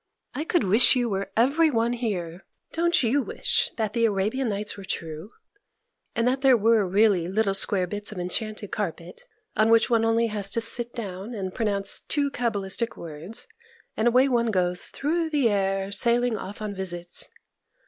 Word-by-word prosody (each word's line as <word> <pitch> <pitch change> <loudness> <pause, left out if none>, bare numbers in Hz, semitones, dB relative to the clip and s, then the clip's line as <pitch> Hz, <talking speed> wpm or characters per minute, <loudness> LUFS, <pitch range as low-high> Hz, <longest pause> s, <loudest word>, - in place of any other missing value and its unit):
I 300 - -3
could 345 0 +1
wish 215 +8 +5
you 245 -2 +1
were 195 0 -3
every 285 +8 +4
one 235 -2 +1
here. 190 -7 -4 0.3
Don't 340 -1 +2
you 255 +5 +2
wish 485 - 0
that 220 -2 -1
"The 230 -1 +2
Arabian 220 +5 0
Nights" 205 0 -3
were 200 - -10
true? 165 0 -5 0.9
and 230 +1 +1
that 260 +2 +1
there 265 -3 +5
were 220 -2 +3
really 195 -2 +3
little 200 +1 +1
square 195 -1 +3
bits 205 +3 -5
of 210 - -8
enchanted 215 +5 -3
carpet, 485 - -5 0.3
on 215 +1 +3
which 230 +2 +4
one 230 -1 +4
has 225 - +2
only 230 +1 +2
to 210 0 -2
sit 235 +1 0
down 205 0 -6
and 190 -3 -4
pronounce 200 -4 -1
two 285 -2 0
cabalistic 230 -2 -2
words, 165 +6 -8 0.5
and 220 - +1
away 250 +3 +5
one 235 -3 +1
goes 180 -3 0
through 325 +3 -1
the 280 -7 +2
air, 195 -1 0
sailing 235 +3 +2
off 205 +1 -7
on 210 -1 -3
visits? 175 -3 -3
220 Hz, 175 wpm, -25 LUFS, 195-240 Hz, 0.9 s, wish